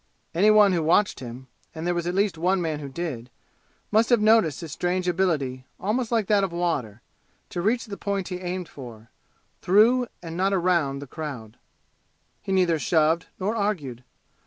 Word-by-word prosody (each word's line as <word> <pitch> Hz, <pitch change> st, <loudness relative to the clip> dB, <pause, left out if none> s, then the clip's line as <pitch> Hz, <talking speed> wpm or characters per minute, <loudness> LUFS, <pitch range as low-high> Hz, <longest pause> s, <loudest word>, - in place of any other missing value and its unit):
Any 195 Hz, +6 st, +4 dB
one 210 Hz, -2 st, +6 dB
who 170 Hz, -, +1 dB
watched 170 Hz, +6 st, +2 dB
him 125 Hz, +1 st, -8 dB, 0.3 s
and 160 Hz, +1 st, -5 dB
there 175 Hz, -, +1 dB
was 175 Hz, 0 st, -2 dB
at 175 Hz, -, -2 dB
least 200 Hz, -2 st, +1 dB
one 180 Hz, +4 st, +1 dB
man 160 Hz, -3 st, -2 dB
who 140 Hz, -2 st, -7 dB
did 135 Hz, -6 st, -5 dB, 0.6 s
must 220 Hz, +2 st, +3 dB
have 240 Hz, -2 st, +5 dB
noticed 215 Hz, -, +3 dB
his 165 Hz, -3 st, -7 dB
strange 180 Hz, +4 st, -1 dB
ability, 150 Hz, -8 st, -1 dB
almost 220 Hz, +5 st, -1 dB
like 225 Hz, -3 st, +2 dB
that 205 Hz, 0 st, +3 dB
of 190 Hz, -, -1 dB
water, 145 Hz, -11 st, -2 dB, 0.5 s
to 175 Hz, -, -3 dB
reach 235 Hz, +7 st, +1 dB
the 205 Hz, -3 st, -7 dB
point 200 Hz, -2 st, -3 dB
he 180 Hz, -1 st, -4 dB
aimed 180 Hz, -1 st, -4 dB
for, 115 Hz, -6 st, -11 dB, 0.5 s
through, 235 Hz, +6 st, +4 dB, 0.2 s
and 165 Hz, -1 st, -6 dB
not 190 Hz, +2 st, +1 dB
around, 170 Hz, -7 st, +1 dB
the -, -, -8 dB
crowd. 130 Hz, -7 st, -7 dB, 0.8 s
He -, -, -5 dB
neither 180 Hz, -4 st, +2 dB
shoved 160 Hz, +1 st, +2 dB
nor 205 Hz, +4 st, -1 dB
argued. 160 Hz, -, -2 dB
175 Hz, 180 wpm, -25 LUFS, 150-200 Hz, 0.8 s, one